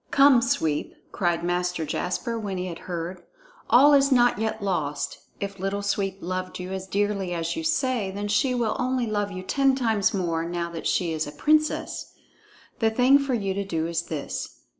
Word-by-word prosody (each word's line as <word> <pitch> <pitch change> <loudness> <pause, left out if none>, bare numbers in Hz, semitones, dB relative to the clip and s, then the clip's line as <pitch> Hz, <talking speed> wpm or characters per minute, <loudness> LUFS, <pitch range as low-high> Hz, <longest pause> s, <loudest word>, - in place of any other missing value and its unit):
"Come, 275 -3 +6
Sweep!" 160 - 0 0.2
cried 175 -2 0
Master 175 -1 -1
Jasper 205 +9 -2
when 200 -3 -4
he 180 - -2
had 170 -2 -6
heard. 175 +1 -4 0.5
"All 285 +4 +7
is 275 0 +5
not 245 -4 +4
yet 220 -1 -2
lost. 150 -7 -2 0.2
If 200 -1 -5
Little 195 +2 -2
Sweep 195 -1 -1
loved 185 +1 -4
you 180 +1 -6
as 190 0 -5
dearly 200 -2 -1
as 165 -1 -2
you 325 - -3
say, 255 -10 0
then 200 +2 -4
she 210 +5 +2
will 230 -3 0
only 255 -1 0
love 205 -2 -1
you 185 -1 -6
ten 275 +5 +2
times 225 -6 +1
more, 170 -4 -1
now 170 0 -3
that 165 - -4
she 170 -3 +1
is 155 -1 -2
a - - -6
princess! 305 - 0 0.7
The 225 - +3
thing 255 +5 +5
for 275 -2 0
you 200 -4 -1
to 200 +1 -2
do 165 -5 -2
is 170 0 -1
this. 150 -3 -5
200 Hz, 190 wpm, -25 LUFS, 175-240 Hz, 0.7 s, All